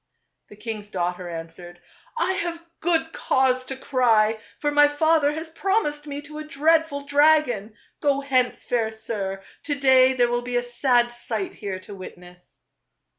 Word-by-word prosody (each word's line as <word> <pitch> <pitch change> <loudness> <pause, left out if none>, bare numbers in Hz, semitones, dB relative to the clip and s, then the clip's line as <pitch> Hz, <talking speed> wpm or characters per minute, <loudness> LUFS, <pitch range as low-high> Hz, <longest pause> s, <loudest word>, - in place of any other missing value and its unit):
" - - -49
The - - -13
king's 210 -1 -6
daughter 180 -2 -3
answered, 170 +1 -9 0.2
" - - -30
I 370 -3 +1
have 340 -2 -3
good 325 -1 0
cause 255 -1 +1
to 270 - -4
cry, 225 -5 +2 0.2
for 295 - -1
my 290 0 +6
father 295 0 +2
has 320 +1 -6
promised 320 -5 -1
me 285 0 -5
to 300 +1 -9
a - - -5
dreadful 305 -1 +1
dragon. 285 -8 +3 0.2
Go 280 -2 +1
hence, 255 -3 0
fair 230 -3 0
sir; 200 -3 -4 0.2
to 290 - -2
day 260 -1 +5
there 245 -2 +2
will 240 0 0
be 245 0 -5
a 245 - 0
sad 245 0 +2
sight 220 -4 -4
here 200 -3 -5
to 205 - -11
witness." 180 -2 -13
255 Hz, 170 wpm, -24 LUFS, 215-295 Hz, 0.2 s, my